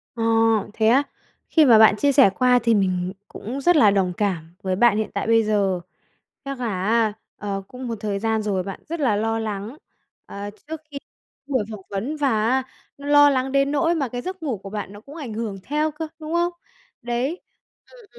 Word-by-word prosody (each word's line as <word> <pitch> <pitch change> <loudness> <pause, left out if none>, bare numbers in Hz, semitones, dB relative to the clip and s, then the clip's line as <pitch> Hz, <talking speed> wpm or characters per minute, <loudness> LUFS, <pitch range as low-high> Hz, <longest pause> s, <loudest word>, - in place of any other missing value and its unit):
Ờ, 225 - -2 0.5
thế 220 -1 +1
á? 265 +5 +5 0.5
Khi 315 -2 +5
mà 230 -4 +7
bạn 220 -1 +7
chia 285 +6 +2
sẻ 270 -7 +6
qua 250 +6 +3
thì 230 -1 +3
mình 185 -2 0
cũng 255 +6 -6
rất 350 +4 +4
là 215 -9 +6
đồng 190 -3 +1
cảm 170 -5 -2
với 185 -1 0
bạn 215 0 +4
hiện 220 - -1
tại - - -2
bây 225 0 +4
giờ. 200 -4 +1 0.6
Chắc 275 -2 -5
là 200 -7 -2
á, 220 0 +2 0.2
ờ, 200 -1 -4
cũng 250 0 -8
một 230 - -3
thời 205 -2 -2
gian 220 0 0
rồi 195 -3 -1
bạn 195 0 -7
rất 335 -1 -3
là 240 -8 +2
lo 225 +2 0
lắng, 215 +4 -5 0.5
ờ, 200 +1 -7 0.2
trước 320 -1 -6
khi 280 - -6 0.5
buổi 260 -6 0
phỏng 210 -3 -7
vấn 235 +11 -3
và 285 -2 +1 0.2
á 260 0 +2 0.3
nó 285 0 -9
lo 290 0 +7
lắng 265 -1 0
đến 275 0 +2
nỗi 330 +4 +2
mà 275 -5 -1
cái 245 +1 -5
giấc 370 0 -6
ngủ 255 -8 -2
của 195 +1 -10
bạn 205 -1 -5
nó 205 - -12
cũng 285 +6 -13
ảnh 270 -9 -6
hưởng 215 -3 -4
theo 300 +2 0
cơ, 315 +1 -5
đúng 310 +1 -6
không? 345 +1 +1 0.5
Đấy. 245 +8 -2 0.5
Ừm, - - -16
230 Hz, 215 wpm, -23 LUFS, 205-280 Hz, 0.6 s, mà